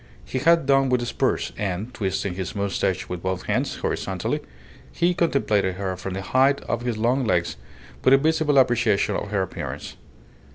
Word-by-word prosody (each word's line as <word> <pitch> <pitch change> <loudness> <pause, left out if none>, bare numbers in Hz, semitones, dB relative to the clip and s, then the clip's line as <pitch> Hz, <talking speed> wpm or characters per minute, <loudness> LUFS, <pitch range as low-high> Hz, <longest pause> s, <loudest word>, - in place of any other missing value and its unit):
He 130 - -3
had 165 +2 +4
done 135 -1 +3
with 125 -1 +2
the 120 - -3
spurs, - - -1
and, 100 +4 -3
twisting 95 -3 -2
his 95 +3 -5
moustache 100 -2 -1
with 90 -1 -5
both 95 0 -2
hands, - - -1
horizontally, - - -2 0.5
he 175 +1 +1
contemplated 110 - +1
her 95 -1 -3
from 95 +1 -5
the 95 - -4
height 135 +7 +3
of 120 - -3
his 120 -2 -2
long 125 +5 +1
legs 85 -7 0 0.5
with 130 - +7
a - - +5
visible 155 0 +2
appreciation 120 -5 +3
of 105 - -3
her 100 -2 0
appearance. 95 - -6
115 Hz, 175 wpm, -24 LUFS, 95-135 Hz, 0.5 s, with